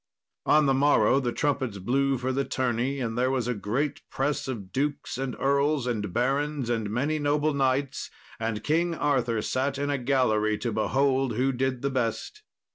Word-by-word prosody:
On 155 0 +5
the 135 - +3
morrow 140 0 +4
the 125 -3 -1
trumpets 135 -6 -1
blew 135 +7 +1
for 130 +1 -2
the 135 +1 0
tourney, 130 +1 -1
and 115 -3 -2
there 125 +2 +1
was 130 -3 -1
a 125 - +1
great 120 +8 -2
press 140 +2 -1
of 105 -8 -5
dukes 145 +1 -2
and 135 -2 -3
earls 140 0 +2
and 105 -6 -2
barons 135 +3 0
and 110 -3 -1
many 145 +8 0
noble 145 +1 +1
knights; 135 0 0 0.3
and 110 -2 -2
King 165 +5 +1
Arthur 125 -8 0
sat 135 +1 -1
in 145 0 -1
a 140 - -1
gallery 110 -5 +2
to 120 +2 -3
behold 135 +2 +1
who 130 +3 +2
did 130 0 -2
the 140 - 0
best. 130 - -2
130 Hz, 180 wpm, -27 LUFS, 120-140 Hz, 0.3 s, On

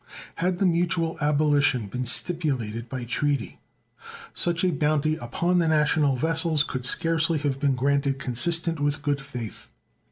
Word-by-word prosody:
Had 180 +1 0
the 195 - +1
mutual 170 -2 +1
abolition 145 -4 +2
been 125 +5 -4
stipulated 125 -8 0
by 130 -2 -5
treaty, 140 +2 -2 0.7
such 170 0 0
a 185 - +3
bounty 155 0 +1
upon 170 +9 0
the 165 - +2
national 150 -2 +2
vessels 160 +2 +1
could 130 -4 -4
scarcely 165 -1 +1
have 145 -2 -2
been 140 -2 +1
granted 140 +1 +1
consistent 165 +5 0
with 145 0 -1
good 145 -1 0
faith. 125 -6 -8
145 Hz, 140 wpm, -25 LUFS, 135-165 Hz, 0.7 s, a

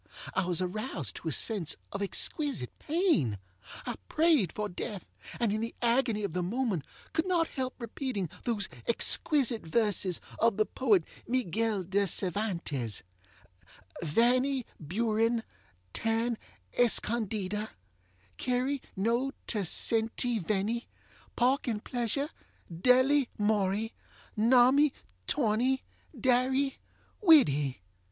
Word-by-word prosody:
I 195 - 0
was 180 0 0
aroused 180 - -4
to - - -8
a - - 0
sense 170 - +2 0.2
of 195 - -5
exquisite 255 - 0
pain. 305 - +1 0.5
I 245 - -4
prayed 310 - +3
for 210 0 -3
death, 195 +1 -6 0.3
and, 230 -4 +1
in 215 - -1
the 230 - -4
agony 235 -3 +1
of 195 -5 -3
the 180 - -1
moment, 195 - -1 0.3
could 320 +2 0
not 345 -3 +2
help 260 -2 -4
repeating 235 -4 -3 0.2
those 220 -4 -1 0.2
exquisite 245 0 +4
verses 195 -1 +1 0.2
of 230 -3 +3
the 215 - +3
poet 215 -9 +2 0.2
Miguel 225 -4 0
De 195 +3 +1
Cervantes: 170 - -1 1.0
Vanny 250 - +2
Buren, 225 +7 0 0.5
tan 225 +1 0 0.3
escondida 215 -3 +1 0.7
Query 255 +2 0
no 235 +7 +1 0.2
te 215 - 0
senty 225 +5 +2
venny 215 +6 -1 0.5
Pork 260 +4 +2
and 220 -3 -2
pleasure, 250 +4 -1 0.4
delly 255 - +4
morry 210 +1 +1 0.4
Nommy, 255 +6 +5 0.3
torny, 255 +1 +1 0.4
darry, 260 +2 +2 0.4
widdy! 145 - +4
225 Hz, 110 wpm, -30 LUFS, 195-255 Hz, 1.0 s, Nommy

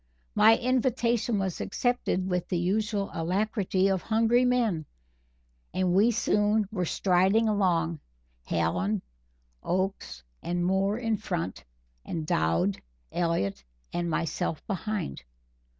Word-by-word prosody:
My 225 +1 +6
invitation 240 -3 +1
was 190 -3 -2
accepted 245 -7 0
with 180 -2 -1
the 180 - 0
usual 200 +3 0
alacrity 190 +2 0
of 190 -2 +1
hungry 230 +3 +3
men, 225 - +1 0.9
and 185 -1 +1
we 205 +5 +5
soon 210 -2 +2
were 180 -5 -1
striding 190 +6 +3
along 170 -6 +1 0.5
Hallen, 90 +5 0 0.6
Oakes 180 - -2 0.2
and 175 0 -1
Moore 195 +3 +1
in 225 -3 0
front 175 - -4 0.4
and 160 -2 -4
Dowd, 85 - +1 0.3
Elliott 100 - -1 0.3
and 175 0 -1
myself 160 -1 -2
behind. 205 - -3
190 Hz, 110 wpm, -28 LUFS, 170-220 Hz, 0.9 s, My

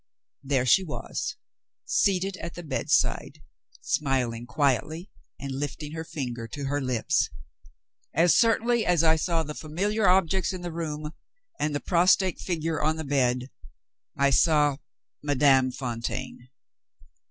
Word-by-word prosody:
There 135 -2 0
she 190 +10 +5
was, 185 +8 -4 0.5
seated 195 - +1
at 170 -1 -7
the 175 - -7
bedside, 150 -1 0 0.4
smiling 125 -5 -1
quietly 150 - 0 0.3
and 140 0 -5
lifting 145 +2 -4
her 160 0 -5
finger 125 -8 -5
to 140 +5 -7
her 145 +1 -1
lips! 130 +2 0 0.8
As 170 +3 +4
certainly 230 0 +3
as 175 -4 +2
I 160 -1 +5
saw 165 0 0
the 150 0 -6
familiar 195 +8 -1
objects 190 +1 +2
in 185 - -6
the 175 -2 -5
room, 155 -2 -4 0.5
and 150 -1 -1
the - - 0
prostrate 180 +2 +3
figure 165 -3 -2
on 155 +1 +1
the 160 - -5
bed, 125 -2 0 0.7
I 140 0 +3
saw 150 -1 +3 0.4
Madame 135 -2 +3
Fontaine! 125 0 -5
150 Hz, 130 wpm, -26 LUFS, 135-170 Hz, 0.8 s, she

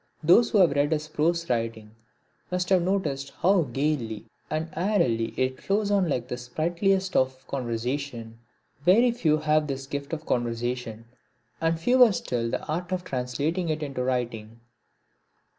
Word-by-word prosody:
Those 185 +9 +6
who 220 - +2
have 180 -6 +6
read 145 +2 +2
his 155 0 -2
prose 170 +2 0
writing 115 -3 -2 0.6
must 180 0 -1
have 190 -2 +4
noticed 150 -7 -1
how 190 +1 +5
gaily 130 -6 -1 0.2
and 155 +1 -2
airily 155 - +1
it 130 0 -1
flows 205 +1 0
on 195 -4 +2
like 125 -3 -1
the 125 - -4
sprightliest 175 +9 0
of 130 0 +1
conversation. 120 -2 -4 0.4
Very 225 +9 +5
few 160 -10 +2
have 155 0 +1
this 135 -1 -4
gift 140 +1 -5
of 160 -1 -4
conversation, 120 -1 -2 0.6
and 165 0 +1
fewer 245 +5 +5
still 120 -9 -2
the - - -3
art 170 +3 -3
of 185 -1 -1
translating 145 +5 -2
it 155 0 -1
into 135 -3 -3
writing. 115 -3 -3
150 Hz, 150 wpm, -26 LUFS, 125-175 Hz, 0.6 s, Those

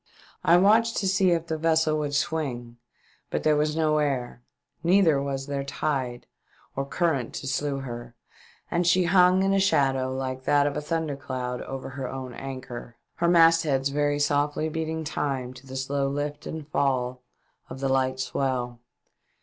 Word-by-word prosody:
I 170 - +6
watched 220 +5 +4
to 195 - 0
see 190 0 +3
if 170 -1 +1
the 160 -1 -3
vessel 160 -1 +2
would 145 -1 -2
swing 140 -7 -2 0.5
but - - -2
there 155 -1 +4
was 150 +1 +1
no 155 -1 +2
air, 130 -5 -2 0.4
neither 170 -5 +4
was 135 -1 -3
there 140 -1 -3
tide 135 -3 -2 0.5
or 135 0 -2
current 140 -6 -1
to - - -5
slue 140 +1 -1
her, 120 -2 -7 0.6
and 175 0 +1
she 180 +1 +4
hung 180 +1 +5
in 195 0 +2
a 195 - +3
shadow 135 -8 +2
like 130 0 -3
that 145 -1 +4
of 145 - -1
a - - -2
thunder 160 -1 -2
cloud 125 -2 -4
over 135 0 -6
her 135 -1 -5
own 130 -2 -6
anchor, 125 -2 -7 0.2
her 170 - +1
mastheads 165 -5 +4
very 145 +1 +1
softly 145 +2 +1
beat 160 0 -3
ing 160 0 -3
time 135 -4 -3
to 130 +1 -14
the 130 - -8
slow 135 +1 -1
lift 145 +1 -4
and 155 -2 -6
fall 130 -3 0 0.5
of 130 - -8
the 135 - -1
light 130 -1 +1
swell. 130 -2 -2
145 Hz, 175 wpm, -26 LUFS, 130-160 Hz, 0.6 s, I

